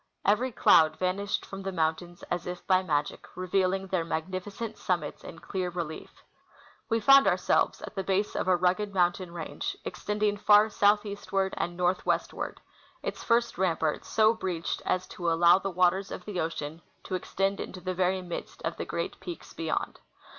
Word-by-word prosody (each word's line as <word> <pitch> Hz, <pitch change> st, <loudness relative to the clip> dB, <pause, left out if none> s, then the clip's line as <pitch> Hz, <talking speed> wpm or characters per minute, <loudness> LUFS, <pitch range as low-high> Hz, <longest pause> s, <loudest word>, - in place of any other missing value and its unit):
Every 230 Hz, +6 st, +2 dB
cloud 160 Hz, -7 st, +5 dB
vanished 195 Hz, +2 st, -1 dB
from 195 Hz, 0 st, -8 dB
the 195 Hz, 0 st, -3 dB
mountains 175 Hz, +1 st, -2 dB
as 175 Hz, 0 st, -2 dB
by 185 Hz, -1 st, +3 dB
magic, 150 Hz, -5 st, -2 dB
reveal 185 Hz, 0 st, +1 dB
ing 195 Hz, 0 st, -2 dB
their 185 Hz, -3 st, -1 dB
magnificent 185 Hz, +7 st, -4 dB
summits 180 Hz, -2 st, -2 dB
in 165 Hz, -, -9 dB
clear 185 Hz, +1 st, -3 dB
relief 170 Hz, -3 st, -6 dB, 0.7 s
We 225 Hz, -, +2 dB
found 275 Hz, +5 st, +7 dB
our -, -, +4 dB
selves -, -, +1 dB
at -, -, -7 dB
the 195 Hz, -, -3 dB
base 195 Hz, +2 st, 0 dB
of -, -, -1 dB
a 185 Hz, -, +5 dB
rugged 185 Hz, +3 st, 0 dB
mountain 175 Hz, 0 st, +1 dB
range 160 Hz, -4 st, -5 dB
extending 210 Hz, 0 st, -1 dB
far 210 Hz, +1 st, +5 dB
southeastward 205 Hz, -2 st, +1 dB
and 175 Hz, 0 st, -3 dB
northwestward, 180 Hz, +1 st, -1 dB, 0.4 s
its -, -, -4 dB
first 235 Hz, -5 st, +1 dB
rampart 160 Hz, -4 st, 0 dB
so 220 Hz, 0 st, +3 dB
breached 180 Hz, -7 st, -3 dB
as 185 Hz, -, +1 dB
to 175 Hz, -2 st, -2 dB
allow 170 Hz, +2 st, +6 dB
the 195 Hz, -, -3 dB
waters 185 Hz, +2 st, +2 dB
of 180 Hz, -, -7 dB
the 205 Hz, -4 st, -4 dB
ocean 160 Hz, -1 st, -3 dB, 0.2 s
to -, -, -7 dB
extend 195 Hz, +2 st, -1 dB
into 185 Hz, -, -6 dB
the 185 Hz, +1 st, -3 dB
very 185 Hz, +1 st, +1 dB
midst 175 Hz, -1 st, -7 dB
of -, -, -3 dB
the -, -, -3 dB
great -, -, -4 dB
peaks 345 Hz, -, -8 dB
beyond. -, -, -3 dB
185 Hz, 170 wpm, -28 LUFS, 175-200 Hz, 0.7 s, found